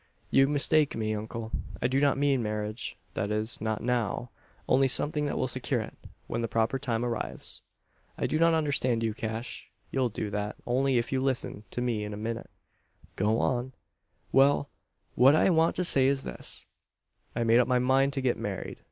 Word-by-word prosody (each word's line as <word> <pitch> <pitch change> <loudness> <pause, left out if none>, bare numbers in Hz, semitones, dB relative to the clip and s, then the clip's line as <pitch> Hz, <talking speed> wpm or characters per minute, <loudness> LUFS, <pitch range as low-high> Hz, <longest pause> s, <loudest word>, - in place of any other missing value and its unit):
"You 135 - +5
mistake 150 +1 +2
me, 110 -1 -1
uncle. 110 +1 -5 0.3
I - - -2
do 130 +2 +2
not 140 -1 +3
mean 140 -2 +2
marriage 105 0 -4 0.2
that 100 - -2
is, 110 +2 -1
not 110 -1 -2
now. 120 0 -1 0.4
Only 135 +1 +4
something 150 +3 +3
that - - -2
will 130 - 0
secure 130 0 -1
it 110 - -6 0.3
when 115 - -3
the 115 - -1
proper 115 +4 0
time 120 -3 -1
arrives." 115 -2 -5 0.6
"I - - -1
do 155 - 0
not 165 0 +4
understand 135 -7 +1
you, 110 -1 0
Cash." 110 +2 -5 0.2
"You'll 130 -2 +1
do 105 -1 -4
that, 105 0 -3
if 125 -1 0
you 135 - +1
only - - -2
listen 125 -5 -2
to 125 - -4
me 115 -4 -1
a 105 0 -5
minute." 115 +2 -4 0.7
"Go 105 +3 +1
on." 125 +1 -1 0.6
"Well; 140 +1 +4 0.4
what 135 +4 +6
I 185 - +4
want 165 0 +3
to 180 - -1
say 135 -5 +6
is 135 0 +1
this. - - -4 0.7
I've 120 0 0
made 115 +1 +5
up 125 - +3
my 125 - +3
mind 135 +2 +2
to 135 - -2
get 130 -2 +1
married. - - -5
125 Hz, 185 wpm, -28 LUFS, 110-135 Hz, 0.7 s, what